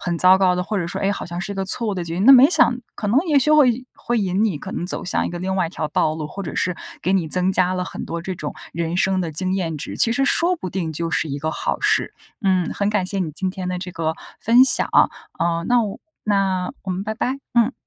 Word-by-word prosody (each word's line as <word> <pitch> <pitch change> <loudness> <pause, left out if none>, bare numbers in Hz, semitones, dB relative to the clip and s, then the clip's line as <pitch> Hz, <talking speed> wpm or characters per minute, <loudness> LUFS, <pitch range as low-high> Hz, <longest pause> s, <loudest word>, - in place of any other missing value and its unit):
很 170 -1 -2
糟 185 +1 +6
糕 185 -2 +3
的， 180 - -1
或 205 +2 -2
者 170 - -2
说， - - -5
哎， 195 - +1
好 - - -5
像 175 0 -5
是 200 +1 -4
个 195 - -2
错 225 +4 -1
误 205 - -1
的 175 -2 -3
决 165 - -5
定， 185 +4 0
那 270 - +9
没 260 +1 +9
想 315 -7 +3 0.2
可 210 - -5
能 240 +6 +4
也 300 -4 +4
许 275 +3 +2
会 255 -5 +4
会 240 -1 -1
引 195 +2 +1
你 185 -9 -1
可 190 - -8
能 - - -3
走 - - -5
向 - - -1
一 - - -4
个 175 - -5
另 190 +1 -2
外 180 -3 +1
一 - - -8
条 155 - -3
道 155 +1 +1
路， 155 -1 -4
或 200 - -8
者 165 - -6
是 180 -1 -1 0.3
给 185 - +1
你 185 -4 +1
增 180 +3 +2
加 185 0 +2
了 180 0 -2
很 - - -6
多 170 0 -4
这 185 +1 -4
种 150 - -5 0.2
人 170 +1 -2
生 190 0 +2
的 165 -2 -2
经 185 +4 -2
验 165 -5 -2
值， 145 - -5
其 230 - +2
实 275 +2 +1
说 340 +6 +2
不 185 - -6
定 170 -4 -3
就 165 +2 -3
是 160 - 0
一 140 - -3
个 155 - -1
好 - - -2
事。 - - +1 0.3
嗯， 185 -3 +1
很 200 - -1
感 205 -3 0
谢 195 +1 -3
你 170 -4 -1
今 190 +3 -2
天 185 -1 -5
的 180 - -2
这 180 0 -6
个 160 -2 -2 0.3
分 240 +3 +6
享 265 - +3
啊， - - +6 0.3
呃， 170 0 0
那 245 -1 +4
我 205 -2 -5 0.3
那 195 -3 0
我 190 - -5
们 185 +1 -2
拜 220 - -3
拜， 255 +4 -2 0.2
嗯。 235 +2 +3
185 Hz, 305 characters per minute, -21 LUFS, 175-215 Hz, 0.3 s, 那